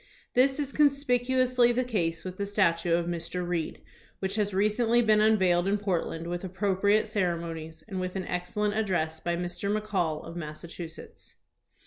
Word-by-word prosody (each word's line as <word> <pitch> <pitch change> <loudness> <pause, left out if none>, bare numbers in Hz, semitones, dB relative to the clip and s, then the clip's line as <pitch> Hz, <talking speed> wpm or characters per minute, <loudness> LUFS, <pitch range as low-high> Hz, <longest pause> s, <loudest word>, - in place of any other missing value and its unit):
This 265 +3 +3
is 280 -2 -2
conspicuously 255 -4 +3
the 250 +1 +1
case 170 -9 -1
with 185 0 -6
the 200 - -2
statue 170 -4 +2
of 170 0 0
Mr. 175 +1 -3
Reed 170 -3 -3 0.3
which 190 0 -2
has 205 -1 0
recently 215 +4 +2
been 215 -1 +4
unveiled 190 -5 +3
in 200 +1 +2
Portland 175 -4 -2
with 175 +1 -4
appropriate 195 +2 +1
ceremonies 170 -6 -3
and 195 -4 -4
with 185 0 -3
an 190 -1 -2
excellent 205 +4 -1
address 180 -7 -1
by 170 +1 -1
Mr. 175 +3 -3
McCall, 195 -7 -1
of 165 - -8
Massa 155 0 -7
chusetts. 165 -1 -10
190 Hz, 160 wpm, -28 LUFS, 170-215 Hz, 0.3 s, been